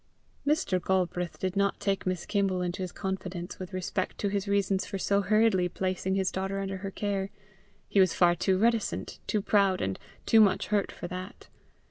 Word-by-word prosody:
Mr. 195 - +1
Galbraith 180 -2 0
did 185 0 -2
not 200 0 +1
take 195 -2 -1
Miss 185 -2 -1
Kimble 195 -3 +1
into 180 +1 -3
his 185 - -3
confidence 185 -2 -5
with 185 0 -6
respect 185 0 -2
to 205 - -1
his 200 0 -2
reasons 200 -1 +1
for 195 - -4
so 200 +1 +2
hurriedly 205 -2 +3
placing 185 +1 -1
his 190 -1 +1
daughter 195 +1 -2
under 195 0 -3
her 195 +1 -5
care: 195 -1 -2 0.6
he 200 - +2
was 185 -3 +4
far 175 -1 +5
too 185 +2 +1
reticent, 230 +1 0
too 210 -2 0
proud, 200 -3 +3
and 95 0 -2 0.3
too 225 - +6
much 195 -2 +3
hurt 205 -2 +1
for 175 - -7
that. 185 +2 -8
190 Hz, 185 wpm, -29 LUFS, 185-200 Hz, 0.6 s, too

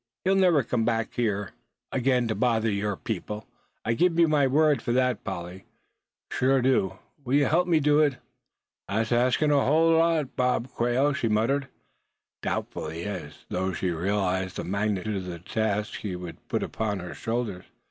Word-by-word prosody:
He'll 190 - +4
never 180 -7 +4
come 120 -2 0
back 115 -1 0
here 105 -4 -1 0.4
again 125 -2 +1
to 110 - 0
bother 115 -2 +1
your 100 -1 -1
people; 105 0 -5 0.4
I 115 - +2
give 170 +6 +2
you 170 -1 +6
my 145 -3 +3
word 145 -1 +3
for - - -2
that, 125 -3 +1
Polly, 90 -1 -6 0.7
sure 135 +2 +2
I - - +2
do. 125 -7 +1 0.3
Will 130 +1 0
you 145 0 +4
help 175 +6 +2
me 165 -3 +4
do 150 0 +3
it?" 145 -4 +3 0.7
"Thet's 110 +3 0
asking 125 +5 +3
a 140 -1 +4
hull 160 +4 +4
lot, 165 -3 +2
Bob 125 0 0
Quail," 125 +5 +1
she 120 - -1
muttered, 125 +6 +1 0.7
doubtfully, 80 +2 -3
as 90 -7 -7
though 95 +1 -1
she 90 +1 -1
realized 95 +1 -1
the - - -3
magnitude 100 +1 -1
of 95 - -5
the 90 -2 -5
task 105 +3 -2
he 100 -4 -4
would 90 -1 -9
put - - -1
upon 105 -2 -2
her 90 -2 -6
shoulders. 115 -5 -3
115 Hz, 175 wpm, -26 LUFS, 100-140 Hz, 0.7 s, you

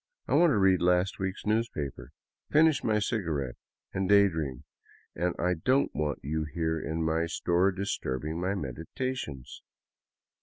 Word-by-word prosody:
I - - -1
want 175 - +6
to 135 - +2
read 95 -2 +4
last 90 +3 +2
week's 95 0 -3
newspaper, 105 - -2 0.4
finish 155 -1 +4
my 110 -1 +2
cigarette, 80 - -1 0.4
and 95 0 -1
day 100 0 +7
dream, 75 -7 -4 0.5
and 90 +2 -1
I 90 +1 +1
don't 130 - +1
want 75 -1 -2
you 80 +3 -1
here 80 +1 -1
in 80 +2 -2
my 80 +1 +1
store 90 +3 +2
disturbing 80 -5 -3
my 95 +2 0
medi 75 -3 -5
tations." 125 - -4
90 Hz, 150 wpm, -29 LUFS, 80-100 Hz, 0.5 s, day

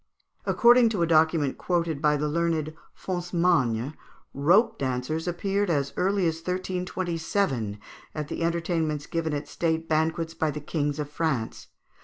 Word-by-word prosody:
According 240 0 +6
to 205 -6 0
a - - +4
document 160 -3 +2
quoted 170 -5 -1
by 150 -1 +3
the 150 +1 -1
learned 160 -1 0 0.2
Foncemagne, 170 -9 0 0.4
rope 175 - +3
dancers 135 +5 -2
appeared 195 +3 0
as 140 -4 0
early 190 +1 +1
as 160 -1 0
1327 180 - -2 0.4
at 150 -2 -3
the - - -5
entertainments 165 -3 -1
given 160 -2 -2
at 145 0 -4
state 165 -1 -1
banquets 160 +1 0
by 160 -1 0
the 150 - -4
kings 145 -1 -2
of 150 -2 -3
France. 145 -6 -2
160 Hz, 140 wpm, -26 LUFS, 150-175 Hz, 0.4 s, According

